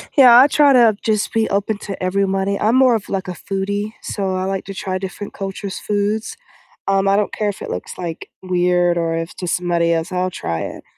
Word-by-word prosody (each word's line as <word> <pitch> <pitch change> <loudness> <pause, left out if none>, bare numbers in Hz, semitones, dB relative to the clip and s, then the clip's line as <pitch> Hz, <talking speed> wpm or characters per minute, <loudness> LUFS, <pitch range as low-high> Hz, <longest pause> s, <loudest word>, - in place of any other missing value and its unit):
Yeah, 250 -4 +8
I 275 - +8
try 290 -2 +4
to 230 -4 +5
just 215 -2 0
be 225 -1 +1
open 200 +1 0
to 195 -2 -7
everybody, 195 +1 0
I'm 220 +4 +2
more 255 -3 +5
of, 210 - -5
like, 195 -1 -3
a - - -3
foodie, 200 +4 -3
so 190 -2 -3
I 185 - -1
like 195 0 -3
to 195 - -7
try 190 -1 -3
different 195 +2 -7
cultures' 195 0 -5
foods, 210 +2 -2 0.5
um, 195 0 +2
I 195 +1 +4
don't 210 - -1
care 210 -1 -1
if 200 - -7
it - - -6
looks, 90 - -6
like, 170 -2 -6
weird 180 -1 +1
or 165 -1 0
if 165 +1 -4
to 180 - -5
somebody 170 -1 +1
else, 165 +3 -2
I'll 185 0 0
try 85 - -3
it, - - -6
195 Hz, 220 wpm, -19 LUFS, 180-210 Hz, 0.5 s, Yeah